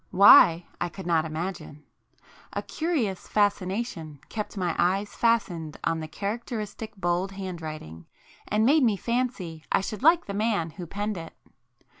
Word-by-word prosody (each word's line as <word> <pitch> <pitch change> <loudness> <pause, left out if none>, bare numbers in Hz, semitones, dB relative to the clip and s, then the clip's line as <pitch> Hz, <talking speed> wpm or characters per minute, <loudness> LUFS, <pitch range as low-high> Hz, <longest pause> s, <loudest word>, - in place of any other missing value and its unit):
Why, 175 -3 +7 0.2
I 175 - 0
could 190 +2 -9
not 165 -2 +2
imagine. 160 -2 -5 0.7
A - - -3
curious 275 - -2
fascination 195 - -1
kept 210 -1 -5
my 175 -3 -1
eyes 195 +4 +1
fastened 180 -10 0
on 165 0 0
the 155 - -5
characteristic 215 +3 -5
bold 180 +1 -1
handwriting, 160 - -7 0.4
and 215 +1 +2
made 295 +5 +5
me 225 -6 +3
fancy 235 -10 -2
I - - +3
should 210 +1 -5
like 330 +4 +5
the 200 - -5
man 205 -6 0
who 175 +1 -8
penned 205 +3 -3
it. 165 -1 -8
195 Hz, 145 wpm, -26 LUFS, 165-215 Hz, 0.7 s, Why